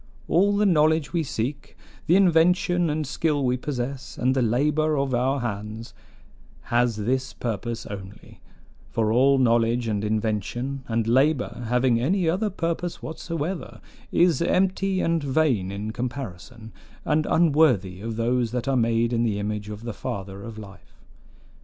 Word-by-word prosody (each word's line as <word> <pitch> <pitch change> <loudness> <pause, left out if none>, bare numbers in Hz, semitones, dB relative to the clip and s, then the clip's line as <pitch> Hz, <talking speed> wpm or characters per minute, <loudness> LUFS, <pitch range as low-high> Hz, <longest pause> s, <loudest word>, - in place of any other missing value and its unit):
All 200 +4 +3
the 210 - +3
knowledge 155 -5 +3
we 170 - +1
seek, 140 0 -4 0.3
the 170 - +5
invention 175 -1 +3
and 150 0 -1
skill 145 0 0
we 125 0 +2
possess, 130 0 -5
and 130 +1 +2
the 130 - +2
labor 150 +6 +1
of 135 -1 0
our 130 +3 +1
hands, 110 0 -5 0.8
has 120 -1 +3
this 130 +5 -1
purpose 115 0 -4
only: 100 +1 -10 0.5
for 110 -1 0
all 135 +3 +4
knowledge 120 -1 +2
and 105 -2 -1
invention 110 +5 -2
and 115 -1 0
labor 130 0 +1
having 125 0 +2
any 175 +6 +1
other 190 +6 +1
purpose 170 -2 -3
whatsoever 165 +2 -5 0.3
is 170 -1 +3
empty 190 +2 +1
and 165 -2 0
vain 130 -9 +1
in 105 +2 -4
comparison, 115 -2 -6 0.3
and 155 0 +1
unworthy 140 - +3
of 115 +1 -4
those 120 +1 0
that 125 0 -2
are 135 - +2
made 115 0 +1
in 115 - +1
the 110 -4 0
image 105 0 -3
of 105 +1 -7
the 120 -2 -4
Father 95 0 -6
of 110 +1 -8
life. 100 -2 -13
125 Hz, 150 wpm, -24 LUFS, 115-155 Hz, 0.8 s, the